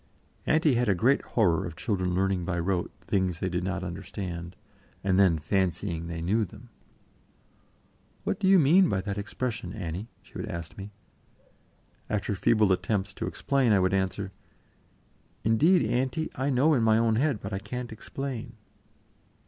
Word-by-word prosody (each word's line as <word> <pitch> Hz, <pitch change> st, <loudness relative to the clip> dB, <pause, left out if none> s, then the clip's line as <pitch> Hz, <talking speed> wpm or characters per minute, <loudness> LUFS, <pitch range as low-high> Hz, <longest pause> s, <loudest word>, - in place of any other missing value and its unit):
Auntie 155 Hz, -2 st, +4 dB
had 120 Hz, -2 st, +1 dB
a 100 Hz, -, +4 dB
great 125 Hz, +10 st, +3 dB
horror 90 Hz, -8 st, +1 dB
of 85 Hz, -, -6 dB
children 90 Hz, -5 st, -1 dB
learning 95 Hz, -1 st, +1 dB
by 85 Hz, 0 st, -2 dB
rote 90 Hz, +1 st, 0 dB
things 95 Hz, -3 st, 0 dB
they 95 Hz, -, -1 dB
did 90 Hz, 0 st, -2 dB
not 95 Hz, 0 st, -2 dB
understand, 90 Hz, -1 st, -6 dB, 0.5 s
and 95 Hz, -1 st, +2 dB
then 90 Hz, -5 st, +5 dB
fancying 85 Hz, 0 st, -1 dB
they 85 Hz, -1 st, -5 dB
knew 105 Hz, +6 st, +2 dB
them. 95 Hz, -, -10 dB, 1.5 s
"What -, -, -1 dB
do 195 Hz, -, +1 dB
you 195 Hz, 0 st, +7 dB
mean 175 Hz, +4 st, +5 dB
by 95 Hz, -, 0 dB
that 100 Hz, +1 st, -4 dB
expression, 105 Hz, -2 st, -4 dB
Annie?" 95 Hz, +1 st, -5 dB
she -, -, -23 dB
would -, -, -4 dB
ask 85 Hz, -1 st, -6 dB
me. 100 Hz, +1 st, -8 dB, 1.2 s
After 105 Hz, 0 st, -1 dB
feeble 105 Hz, +1 st, +3 dB
attempts 95 Hz, +1 st, 0 dB
to -, -, -4 dB
explain, 135 Hz, -5 st, +1 dB
I 100 Hz, -, +5 dB
would 95 Hz, +1 st, +2 dB
answer: 95 Hz, 0 st, -1 dB, 1.1 s
"Indeed, 130 Hz, -, +4 dB
Auntie, 130 Hz, +6 st, -1 dB
I 135 Hz, +2 st, -1 dB
know 140 Hz, +4 st, +4 dB
in 130 Hz, -, +3 dB
my 110 Hz, -1 st, +4 dB
own 115 Hz, -1 st, +2 dB
head, 135 Hz, -3 st, +1 dB
but 100 Hz, +1 st, -6 dB
I 95 Hz, -, -1 dB
can't 120 Hz, +4 st, -6 dB
explain." 120 Hz, +1 st, -6 dB
100 Hz, 165 wpm, -28 LUFS, 90-120 Hz, 1.5 s, you